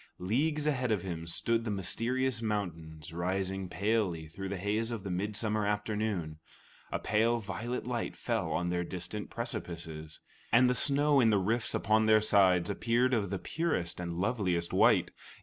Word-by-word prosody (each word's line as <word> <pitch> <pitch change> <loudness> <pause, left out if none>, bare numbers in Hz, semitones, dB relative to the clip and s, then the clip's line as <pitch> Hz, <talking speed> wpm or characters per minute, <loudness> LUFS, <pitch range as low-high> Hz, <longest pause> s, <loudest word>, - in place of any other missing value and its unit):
Leagues 145 - 0
ahead 130 -5 0
of 105 -5 0
him 85 -3 -5
stood 115 +7 0
the 115 - -3
mysterious 115 +5 -1
mountains 85 -7 -4
rising 95 +2 -2
palely 100 -5 0
through 95 +5 -6
the 100 - -3
haze 105 +4 -1
of 115 -4 -4
the 95 - -4
midsummer 105 +3 -1
afternoon. 105 -6 -2 0.5
A - - 0
pale 115 +3 +2
violet 110 +4 -4
light 120 -1 -3
fell 110 -8 -1
on 90 0 0
their 90 0 0
distant 90 +4 -5
precipices, 85 - -6 0.3
and 125 +3 +6
the 125 - +3
snow 145 +2 +4
in 115 -3 +5
the 105 - +4
rifts 110 +4 +1
upon 110 +1 +2
their 110 0 +6
sides 95 -4 +4
appeared 120 +5 +1
of 105 -5 +1
the 100 - -2
purest 120 - -2
and 85 -1 -4
loveliest 90 -4 0
white. - - +4
105 Hz, 165 wpm, -31 LUFS, 90-115 Hz, 0.5 s, and